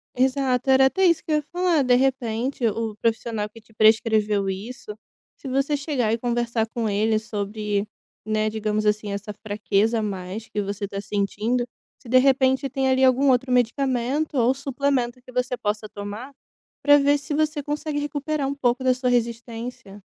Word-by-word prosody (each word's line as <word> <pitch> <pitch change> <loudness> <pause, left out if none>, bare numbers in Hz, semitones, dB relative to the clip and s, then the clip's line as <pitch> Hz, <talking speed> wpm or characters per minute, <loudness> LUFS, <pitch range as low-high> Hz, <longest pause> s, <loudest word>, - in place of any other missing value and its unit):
Exato, 260 0 +1
era 265 0 +6
até 380 +8 +2
isso 335 -2 +2
que 315 - -5
ia 300 - +3
falar, 355 -4 +2
de 250 -1 +4
repente 250 -1 0
o 220 0 -2
profissional 225 -1 -1
que 225 - -14
te 220 0 -24
prescreveu 215 -2 +3
isso, 210 +3 -6 0.4
se - - -10
você 275 +3 +1
chegar 275 -6 -1
e 230 - -1
conversar 235 -1 0
com 225 -1 -3
ele 215 +2 +1
sobre, 210 -1 -3 0.4
né, 215 0 0
digamos 215 0 -1
assim, 210 -1 0
essa 200 +1 -5
fraqueza 215 +1 0
a - - -2
mais 195 +1 -5
que 210 - -2
você 200 +1 -3
está 200 0 -5
sentindo, 210 +4 -1 0.4
se - - -16
de 255 +2 +5
repente 265 +1 +3
tem 265 +1 0
ali 260 0 +3
algum 265 +2 +4
outro 255 +1 +1
medicamento 255 +4 0
ou 245 +2 +4
suplemento 270 -2 -1
que 255 0 -15
você 250 0 -1
possa 210 0 -3
tomar 205 +7 -7 0.5
pra 290 0 +7
ver 285 +1 +3
se 280 +1 -6
você 305 0 0
consegue 295 +1 -3
recuperar 290 0 -2
um 275 - -1
pouco 260 -2 0
da 255 -1 +4
sua 250 0 -1
resistência. 230 -3 -3
240 Hz, 175 wpm, -24 LUFS, 215-270 Hz, 0.5 s, pra